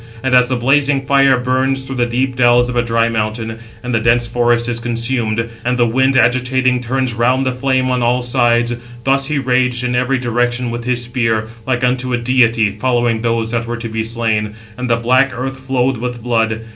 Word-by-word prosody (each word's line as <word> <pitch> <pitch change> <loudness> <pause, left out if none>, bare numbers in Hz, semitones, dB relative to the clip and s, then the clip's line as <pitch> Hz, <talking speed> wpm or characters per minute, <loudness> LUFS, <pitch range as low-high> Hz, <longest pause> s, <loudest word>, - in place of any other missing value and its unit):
And 130 -1 0
as 125 -1 +5
the 130 - 0
blazing 135 +2 +1
fire 135 -1 +4
burns 130 +2 -1
through 135 -1 -6
the 120 -1 +1
deep 130 +2 -1
dells 120 0 +3
of 125 - -4
a 120 - +3
dry 115 -1 +1
mountain, 110 0 -3 0.2
and 125 0 -4
the 115 - +2
dense 120 +1 +2
forest 120 0 +1
is 120 -1 -2
consumed, 115 -1 -2
and 125 +1 0
the 120 - +3
wind 130 +3 +2
agitating, 125 +1 +2
turns 130 +1 -1
round 125 +4 +1
the 130 - +1
flame 130 0 0
on 125 -1 0
all 120 +1 +1
sides; 120 -1 +1 0.3
thus 135 +1 +1
he 150 -1 -1
raged 125 -2 0
in 125 0 -1
every 125 +2 +1
direction 120 0 -1
with 120 0 -5
his 125 -1 0
spear, 115 -3 -1 0.2
like 125 -1 -1
unto 125 0 0
a - - +2
deity, 120 -3 +2
following 120 +1 0
those 115 -1 -1
that 115 -1 -2
were 120 0 -3
to 115 0 -5
be 110 0 -2
slain; 110 -2 -2 0.2
and 125 +1 -4
the 115 - +3
black 130 +3 +2
earth 135 +2 -5
flowed 130 -1 -1
with 120 0 -5
blood. 115 -2 0
120 Hz, 210 wpm, -16 LUFS, 115-130 Hz, 0.3 s, as